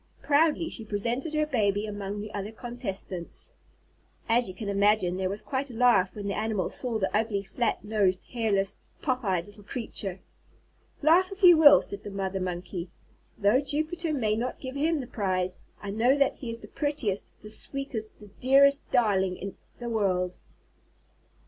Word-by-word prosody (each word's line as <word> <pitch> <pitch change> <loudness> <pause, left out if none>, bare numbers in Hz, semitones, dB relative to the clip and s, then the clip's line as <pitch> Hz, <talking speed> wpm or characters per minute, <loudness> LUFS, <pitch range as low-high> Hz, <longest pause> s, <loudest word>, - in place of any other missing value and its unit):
Proudly 305 +3 +3
she 235 - -5
presented 235 +8 -2
her 305 0 +2
baby 210 -7 +1
among 205 -1 -4
the 210 0 -8
other 205 +1 -4
contestants. 220 -7 -6 0.7
As 235 +1 +3
you 185 - -8
can 210 +1 -6
imagine, 200 -2 +2
there 185 0 -1
was 200 +2 -4
quite 270 +1 -2
a 240 - -9
laugh 230 -6 +4
when 205 -1 -6
the 200 - -1
Animals 215 -4 -1
saw 245 -3 -1
the 195 -1 -1
ugly 215 -2 0
flat 235 +4 -1
nosed, 200 -4 +1
hairless, 205 -4 0 0.3
pop 255 -3 0
eyed 185 -4 0
little 205 0 -15
creature. 200 -4 -5 0.8
"Laugh 355 +5 +5
if 390 +1 -9
you 350 -1 +10
will," 310 -2 +8
said 200 - -7
the 205 - -6
Mother 195 -1 -3
Monkey. 180 -1 -4 0.5
"Though 210 +6 +4
Jupiter 315 +4 -1
may 220 -8 +1
not 245 +3 -3
give 260 0 -6
him 310 +1 +1
the - - -6
prize, 185 -5 -1 0.2
I 200 - -4
know 240 +6 +3
that 275 -1 +2
he 250 - -6
is 230 - -3
the - - -12
prettiest, 285 -10 -2
the 210 - -8
sweetest, 240 -2 -4
the 210 -1 -13
dearest 280 +2 +4
darling 190 -6 +2
in 195 0 -6 0.2
the 240 -1 -5
world." 185 -4 0
215 Hz, 175 wpm, -28 LUFS, 195-260 Hz, 0.8 s, you